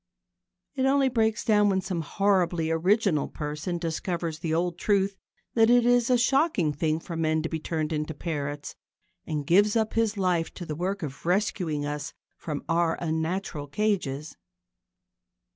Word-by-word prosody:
It 265 -2 +1
only 270 0 +3
breaks 225 -3 +1
down 210 -3 +4
when 190 -1 +2
some 185 -2 -3
horribly 175 -2 +1
original 180 -1 +2
person 150 +4 -4
discovers 165 -1 -3
the 165 -1 -3
old 170 +1 0
truth 200 -1 +1 0.4
that 225 -1 +4
it 245 0 +5
is 245 0 +3
a 250 - +5
shocking 245 - +2
thing 155 +2 0
for 170 0 -7
men 160 -1 +1
to 160 - -2
be 160 - -3
turned 155 0 -2
into 150 0 -3
parrots, 145 -2 -4 0.5
and 150 -2 -2
gives 205 +7 +4
up 220 -1 +1
his 225 -2 +1
life 180 -4 +1
to 175 - -6
the 155 - -4
work 185 +3 -2
of 140 -3 -6
rescuing 175 -5 0
us 145 -2 -4 0.2
from 150 -3 -5
our 165 0 +2
unnatural 160 -1 -2
cages. 155 -6 -1
175 Hz, 160 wpm, -27 LUFS, 155-205 Hz, 0.5 s, it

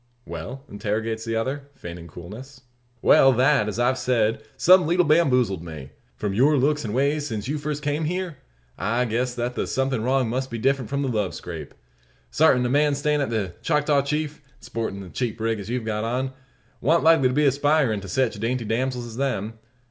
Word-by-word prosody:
"Well?" 135 +2 -7
interrogates 110 +2 -3
the 115 0 -2
other, 135 +5 -3
feigning 85 -4 -9
coolness. 110 - -10 0.4
"Well; 135 - +7
that, 130 -2 +3
as 105 - -3
I've 125 +2 +2
said, 115 -3 +1 0.2
some 185 -2 +6
leetle 175 +1 +3
bamboozled 125 - +3
me. 75 -5 -9 0.2
From 105 -2 -3
your 140 +8 +4
looks 150 +3 +1
and 110 -1 -3
ways 145 +2 +1
since 110 -3 -4
you 150 +2 -2
first 150 0 -4
came 150 +2 -1
hyar, 180 -2 -3 0.4
I 120 +3 +1
guessed 125 +2 -1
that 120 +1 -2
the - - -2
something 135 -2 0
wrong 130 +1 +1
must 130 +3 -2
be 120 - -4
different 130 0 0
from 140 +1 -1
a - - -1
love 105 -7 -1
scrape. 80 -5 -8 0.6
Sartint, 135 -5 +4
a - - 0
man 145 +2 +3
stayin' 150 +1 +1
at 140 - -1
the 105 -6 -2
Choctaw 150 -2 +2
Chief, 150 +1 -2 0.2
and 125 - -28
sporting 110 -4 -4
the 95 - -9
cheap 120 -3 -3
rig 115 -1 -1
as 100 +1 -7
you've 120 -1 -2
got 105 -1 -2
on, 130 +3 -2 0.5
wan't 160 +6 +3
likely 160 -5 +5
to 125 - -1
be 150 0 +3
aspirin' 140 -5 +2
to 95 - -9
sech 130 +5 +1
dainty 115 +3 -2
damsels 125 +2 -1
as 115 -1 -9
them. 115 -5 -2
125 Hz, 200 wpm, -24 LUFS, 110-145 Hz, 0.6 s, Well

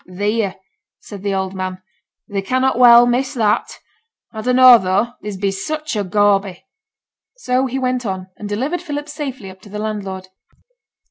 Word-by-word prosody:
'Theere!' 205 +2 -1 0.4
said 205 -3 -10
the 200 -1 -1
old 190 0 -2
man. 185 -1 -5 0.5
'Thee 200 -1 -3
cannot 255 +4 0
well 240 -1 +8
miss 255 +3 0
that. 215 -3 0 0.6
A 220 - -5
dunno 250 0 +7
tho', 195 +6 0
thee 205 -2 -6
bees 195 -1 -2
sich 310 -3 -4
a 205 - 0
gawby.' 195 -1 +1 0.7
So 260 - 0
he 260 +1 -4
went 255 -1 -1
on, 190 -4 -4
and 210 - -8
delivered 270 +12 -2
Philip 295 -3 -5
safely 270 -9 -6
up 190 0 -17
to 205 - -15
the 210 - -7
landlord. 195 -3 -5
215 Hz, 160 wpm, -18 LUFS, 195-255 Hz, 0.7 s, well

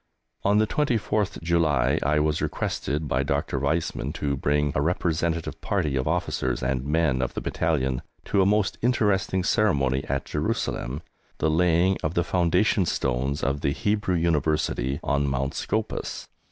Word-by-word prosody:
On 100 +1 +3
the 110 - +4
24th 110 -6 0
July 80 -6 +2
I 75 +2 +2
was 75 0 +1
requested 75 +2 -2
by - - +1
Dr. 70 - -1
Weizmann 80 +5 -1
to 70 -1 -1
bring 75 +1 +1
a 70 - +1
representative 85 0 -1
party 80 -9 0
of 65 -1 -1
officers 65 0 -1
and 65 0 0
men 75 -2 +1
of 65 - -2
the - - -1
battalion 65 -6 -1 0.2
to 100 - +2
a - - +4
most 105 -1 +1
interesting 100 -6 +1
ceremony 70 -11 +2
at 70 0 -2
Jerusalem 70 +6 -2 0.3
the 80 - +1
laying 90 +3 +3
of 80 +2 -2
the 85 - +2
foundation 90 +2 +2
stones 65 +2 -1
of 70 +1 0
the 70 - +1
Hebrew 105 -1 0
University 75 -5 0
On 70 0 +1
Mount 70 +1 -1
Scopus. 110 0 -3
80 Hz, 155 wpm, -25 LUFS, 70-95 Hz, 0.3 s, the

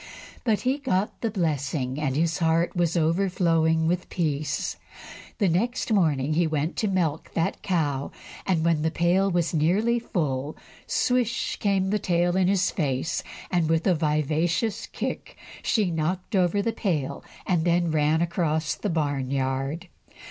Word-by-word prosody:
But 220 -4 +1
he 260 +3 0
got 210 -8 -1
the 230 - 0
blessing, 145 - -1
and 135 -3 -1
his 165 +2 +1
heart 165 +1 +2
was 175 -1 +1
overflowing 165 -1 +2
with 180 +2 -1
peace. 155 -4 -2 0.6
The 200 - +2
next 220 +7 0
morning 155 -7 +2
he 170 +1 +2
went 155 +1 -1
to 215 - +1
milk 170 -6 -1
that 165 - -1
cow, 150 -8 -1 0.4
and 170 -4 +1
when 165 -2 +2
the 160 - +1
pail 175 +4 +2
was 175 -2 0
nearly 200 +10 +2
full, 150 - -2 0.3
swish! 250 -1 0
came 195 -2 +1
the 210 - +1
tail 175 -1 +1
in 185 -1 +3
his 190 -1 +2
face, 140 -1 -1 0.3
and 170 -3 +1
with 165 0 +1
a 185 - +4
vicious 160 - 0
kick - - -5 0.2
she 205 -6 +1
knocked 175 +5 -2
over 185 +2 +2
the 230 - 0
pail, 150 - -2 0.2
and 175 -4 +1
then 170 -1 +2
ran 155 +1 +2
across 160 -2 0
the 205 - -3
barn 145 -5 -1
yard. 135 +5 -2
170 Hz, 155 wpm, -25 LUFS, 155-190 Hz, 0.6 s, a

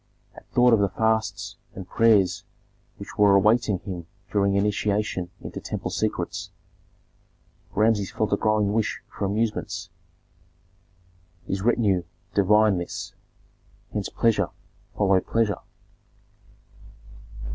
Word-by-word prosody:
At - - -15
thought 125 -1 +4
of 110 - +5
the 100 -1 +2
fasts 105 -2 -1 0.2
and 95 -1 -8
prayers 105 -5 +3 0.5
which - - -10
were 100 -1 +6
awaiting 105 +1 +3
him 90 -4 -7 0.2
during 100 -1 +2
initiation 100 -2 0
into - - -6
temple - - -4
secrets, - - -2 1.3
Rameses 105 -2 +2
felt 110 -2 -1
a - - +6
growing 105 -1 +1
wish 110 -1 0 0.2
for - - -2
amusements. 100 -4 -2 1.5
His 95 - -2
retinue 105 -4 +2 0.3
divined 105 -1 +4
this; 85 - -6 0.8
hence 105 -2 -2
pleasure 105 -5 +1 0.5
followed 95 -2 +2
pleasure. 110 -4 +1
105 Hz, 105 wpm, -25 LUFS, 95-110 Hz, 1.5 s, were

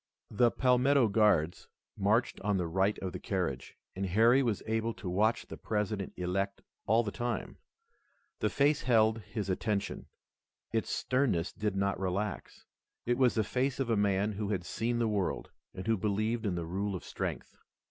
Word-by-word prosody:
The 120 +3 +4
Palmetto 125 0 +3
Guards 100 -6 +2 0.3
marched 105 +5 +1
on 100 0 +1
the 90 - 0
right 95 +5 +1
of 95 - -2
the - - -5
carriage, 90 -10 -3 0.2
and 95 +1 -2
Harry 115 +8 +5
was 115 -6 -1
able 110 +1 -1
to 100 - -8
watch 105 +6 +1
the - - -9
President 105 -2 -2
elect 95 +3 -2 0.2
all 115 +3 +4
the 105 - -3
time. 120 +2 -4 0.8
The - - +1
face 145 +1 +2
held 110 -2 +3
his 105 -1 -5
attention. 100 +2 -2 0.6
Its 115 -1 -1
sternness 125 -10 0
did 105 -2 -2
not 100 0 0
relax. 95 +2 -3 0.4
It 120 +1 +1
was 125 -2 +4
the 110 - +2
face 130 +5 -1
of 130 -3 0
a - - +3
man 100 0 +2
who 105 0 -3
had 95 -4 -1
seen 120 +4 -1
the 120 -1 +1
world, 105 -3 -1 0.2
and 95 - -7
who 115 0 +2
believed 110 +3 0
in 90 - 0
the 85 -1 -3
rule 100 +4 -2
of 90 - -6
strength. - - -5
105 Hz, 175 wpm, -31 LUFS, 95-115 Hz, 0.8 s, Harry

